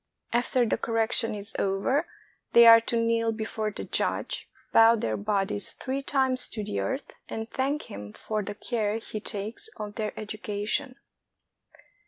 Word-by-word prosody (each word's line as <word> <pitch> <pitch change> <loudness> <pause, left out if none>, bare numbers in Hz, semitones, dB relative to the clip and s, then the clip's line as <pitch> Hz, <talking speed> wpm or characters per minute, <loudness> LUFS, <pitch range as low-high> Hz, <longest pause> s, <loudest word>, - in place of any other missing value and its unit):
After 245 +1 +2
the 220 - 0
cor 230 - -3
rection 225 -1 +1
is 205 +2 -3
over, 200 - +1 0.5
they 235 0 +9
are 230 0 +10
to 230 +1 0
kneel 230 0 +2
before 220 -1 -3
the 210 - -6
judge, - - -1 0.2
bow 225 +1 +8
their 110 - -1
bodies 195 - -1
three 265 +1 -3
times 265 -2 +1
to 215 - -4
the 205 0 -3
earth, 265 +2 -3 0.2
and 220 0 -4
thank 275 +5 -1
him 105 +1 -8
for 215 - -3
the 205 +1 -5
care 215 -1 -1
he 220 -1 -6
takes 210 - -5
of 210 -2 -5
their 215 0 -4
education. 215 +4 -3
225 Hz, 160 wpm, -27 LUFS, 210-235 Hz, 0.5 s, are